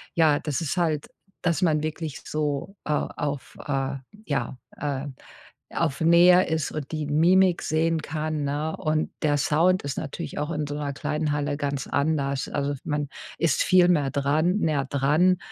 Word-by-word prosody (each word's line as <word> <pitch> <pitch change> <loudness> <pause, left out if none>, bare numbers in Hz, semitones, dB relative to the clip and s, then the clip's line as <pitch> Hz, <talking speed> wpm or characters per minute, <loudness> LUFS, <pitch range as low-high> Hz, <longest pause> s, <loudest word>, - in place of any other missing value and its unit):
ja, 155 -3 +4
das 150 0 -2
ist 165 +3 -2
halt, 155 -4 0 0.3
dass 170 +1 +1
man 155 -3 +2
wirklich 155 0 -4
so, 150 +5 -2
äh, 150 - -2
auf, 145 -1 -3
äh, 135 -1 -1 0.3
ja, 135 -4 -2 0.2
ähm, 140 -1 -3 0.6
auf 160 -3 -1
Nähe 175 +2 +6
ist 160 -2 -1
und 150 -1 -5
die 155 -2 -2
Mimik 175 +4 +4
sehen 160 0 +1
kann, 155 0 -3
ne? 150 +3 -2
Und 155 0 0
der 145 -1 +3
Sound 170 +6 +2
ist 140 -2 -4
natürlich 140 - -5
auch 150 +3 -2
in 150 -3 -2
so 145 - -4
'ner 145 -1 -2
kleinen 150 +1 -2
Halle 145 0 -1
ganz 140 -2 -2
anders. 140 -2 0
Also 145 0 -1
man 145 -1 -1 0.3
ist 165 - +2
viel 180 -1 +5
mehr 145 -6 +2
dran, 155 +7 +1
näher 150 -5 +1
dran 150 +7 +3
150 Hz, 165 wpm, -25 LUFS, 145-160 Hz, 0.6 s, Nähe